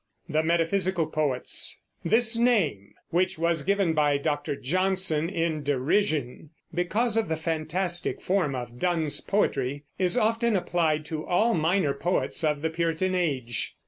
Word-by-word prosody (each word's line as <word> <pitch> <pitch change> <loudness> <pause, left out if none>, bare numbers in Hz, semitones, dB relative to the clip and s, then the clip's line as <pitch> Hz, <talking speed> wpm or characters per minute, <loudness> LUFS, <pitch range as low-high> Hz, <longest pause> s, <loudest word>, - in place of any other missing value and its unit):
THE 155 -2 +1
METAPHYSICAL 170 +1 0
POETS. 145 -5 0 0.2
This 230 +1 +3
name 200 - +1 0.2
which 180 +1 +1
was 165 -1 +1
given 195 0 +1
by 145 -2 +2
Dr. 145 0 -2
Johnson 185 +1 +1
in 165 -4 -1
derision, 145 0 0 0.2
because 210 +6 +1
of 225 -5 0
the 160 - 0
fantastic 165 +3 -2
form 180 -8 0
of 120 -1 -7
Donne's 165 -5 0
poetry 140 -8 -1 0.2
is 185 +5 +2
often 230 0 +2
applied 160 -4 0
to 155 -1 -4
all 215 +8 +2
minor 160 -2 +1
poets 170 +3 -1
of 150 -1 0
the 160 - 0
Puritan 170 +3 -1
Age. 135 - -1
165 Hz, 140 wpm, -26 LUFS, 150-185 Hz, 0.2 s, This